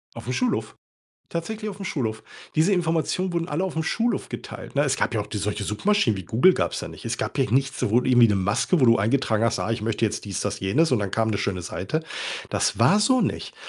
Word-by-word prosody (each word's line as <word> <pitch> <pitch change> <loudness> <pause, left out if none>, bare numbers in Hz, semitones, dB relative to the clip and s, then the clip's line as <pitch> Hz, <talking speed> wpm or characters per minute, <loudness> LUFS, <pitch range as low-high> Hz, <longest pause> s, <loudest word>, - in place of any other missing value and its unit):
Aufm 120 +2 -5
Schulhof. 250 - -1 0.5
Tatsächlich 215 +6 -4
aufm 195 0 -8
Schulhof. 110 -6 -2 0.3
Diese 180 +6 +4
Informationen 175 +2 0
wurden 170 0 -1
alle 165 +6 -1
aufm 160 -4 -2
Schulhof 230 +8 -1
geteilt, - - -8
ne? 140 - +3
Es 135 -1 0
gab 120 - 0
ja 105 - +1
auch 105 - -11
die 105 0 -4
solche 100 0 -2
Suchmaschinen, 115 - +1
wie 95 - -7
Google 155 +12 +5
gab's - - -2
ja - - -5
nicht. - - -10
Es - - -2
gab - - -4
ja - - +1
nichts, 135 +2 +1
sowohl 120 +5 +2
irgendwie 120 -3 +6
'ne 105 - +2
Maske, 100 - +1
wo - - +7
du 115 -2 +5
eingetragen 110 0 +1
hast: 115 +1 +1
„Ah, - - -2
ich 115 - -3
möchte 115 +1 -1
jetzt 105 - -2
dies, 100 - -3
das - - -3
jenes“ 135 - +2
und 120 - +4
dann 100 -2 -2
kam 110 -1 0
'ne 100 - -1
schöne 95 -3 -2
Seite. 125 - -3 0.5
Das - - 0
war 155 - +5
so 255 +4 +3
nicht, - - -3
125 Hz, 235 wpm, -24 LUFS, 110-170 Hz, 0.5 s, wo